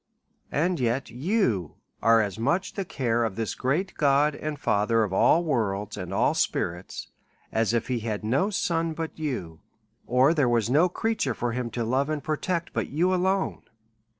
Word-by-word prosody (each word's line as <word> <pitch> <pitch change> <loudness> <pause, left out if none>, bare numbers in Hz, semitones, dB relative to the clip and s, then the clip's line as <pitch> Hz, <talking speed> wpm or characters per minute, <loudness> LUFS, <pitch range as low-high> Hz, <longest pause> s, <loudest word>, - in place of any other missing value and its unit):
And 175 +3 +1
yet 125 +2 -1
you 125 - 0 0.3
are 115 +1 +5
as 100 0 -5
much 170 +11 0
the 195 - -3
care 120 -7 0
of 110 -4 -2
this 110 0 -2
great 155 +10 -1
God 145 +1 +3
and 150 +1 -4
Father 110 -1 +2
of 100 -3 -3
all 165 - +4
worlds, 105 - -1
and - - -6
all - - +2
spirits, 90 +2 -2 0.4
as 110 -1 +1
if 115 -1 0
he 125 -2 -1
had 110 -1 -3
no 135 - +1
son 165 -5 0
but 160 0 -5
you, 90 - -4 0.5
or 130 +5 +4
there 145 -7 +2
were 120 -2 +2
no 160 +7 +4
creature 200 - -1
for 120 0 -2
him 120 0 -3
to 120 - 0
love 130 +5 0
and 155 -3 -2
protect 170 +3 -2
but - - -2
you 175 +6 +1
alone. 190 +1 0
130 Hz, 180 wpm, -26 LUFS, 115-165 Hz, 0.5 s, are